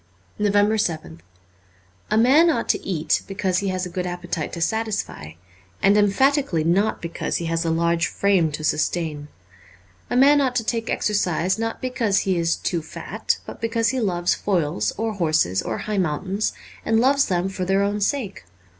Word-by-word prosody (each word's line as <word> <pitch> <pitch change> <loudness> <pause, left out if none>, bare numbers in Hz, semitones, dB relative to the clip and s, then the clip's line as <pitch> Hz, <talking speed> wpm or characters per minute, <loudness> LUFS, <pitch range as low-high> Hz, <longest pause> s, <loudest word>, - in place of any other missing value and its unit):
346 205 0 +2
NOVEMBER 80 - -11
7th 80 - -15 0.9
A 215 - +2
MAN 275 +9 +5
ought 235 -8 0
to - - 0
eat 170 -6 0
because 190 -2 -1
he 200 - -2
has 185 -1 -1
a - - -6
good 180 0 -3
appetite 175 -3 -4
to 170 - -6
satisfy, 210 - -2 0.5
and 200 - +4
emphatically 210 - +2
not 185 +6 +1
because 170 - -3
he 170 - -4
has 165 0 -1
a 165 - -1
large 170 +1 +1
frame 190 -6 +1
to 155 +1 -6
sustain. 155 -1 -1 0.8
A - - -1
man 285 +3 +6
ought 255 -2 0
to 235 - +1
take 230 0 -2
exercise 190 -2 0
not 225 0 -3
because 235 -6 +1
he 190 -1 0
is 170 -1 +1
too 170 -2 -2
fat, 155 - -3
but - - -10
because 230 -1 +1
he 260 +1 -1
loves 175 -6 +1
foils 150 - 0
or 225 +1 -1
horses 155 - +1
or - - -3
high 210 -2 -2
mountains, 190 +5 -1 0.3
and 225 0 +2
loves 275 +3 +3
them 180 0 0
for 190 -1 -4
their 195 +2 +2
own 205 +1 -1
sake. 210 - -2
195 Hz, 180 wpm, -22 LUFS, 170-225 Hz, 0.9 s, man